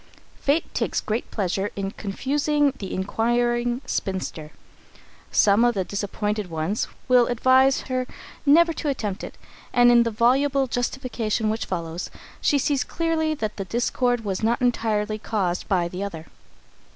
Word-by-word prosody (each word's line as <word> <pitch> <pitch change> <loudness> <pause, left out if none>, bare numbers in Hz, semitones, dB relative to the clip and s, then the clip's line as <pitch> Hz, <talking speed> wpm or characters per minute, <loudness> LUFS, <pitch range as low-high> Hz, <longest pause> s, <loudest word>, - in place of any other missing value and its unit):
Fate 290 +4 0
takes - - 0
great 220 +2 -3
pleasure 195 0 -1
in 195 -1 -3
confusing 280 +7 0
the 195 - -5
inquiring 240 +5 0
spinster. 185 -9 -3 0.8
Some 205 +3 +4
of 240 -1 +3
the 190 - 0
disappointed 205 +1 -3
ones 165 +6 -1 0.2
will 250 -2 +5
advise 260 +2 +4
her 255 -1 -2 0.4
never 330 +4 +5
to 310 - -3
attempt 210 -8 -3
it, - - -8 0.3
and 245 0 +6
in 240 0 +6
the 235 - +1
voluble 265 +5 +2
justification 245 -3 -1
which 220 - -2
follows, 170 -1 -4 0.3
she 290 - +3
sees 280 0 +1
clearly 320 -2 -1
that 215 -7 -4
the 195 - -3
discord 245 +1 0
was 190 -2 -2
not 230 +2 +1
entirely 220 -3 0
caused 190 -5 -2
by 180 -4 +1
the 180 +2 -6
other. 165 -6 -5
230 Hz, 145 wpm, -24 LUFS, 200-260 Hz, 0.8 s, and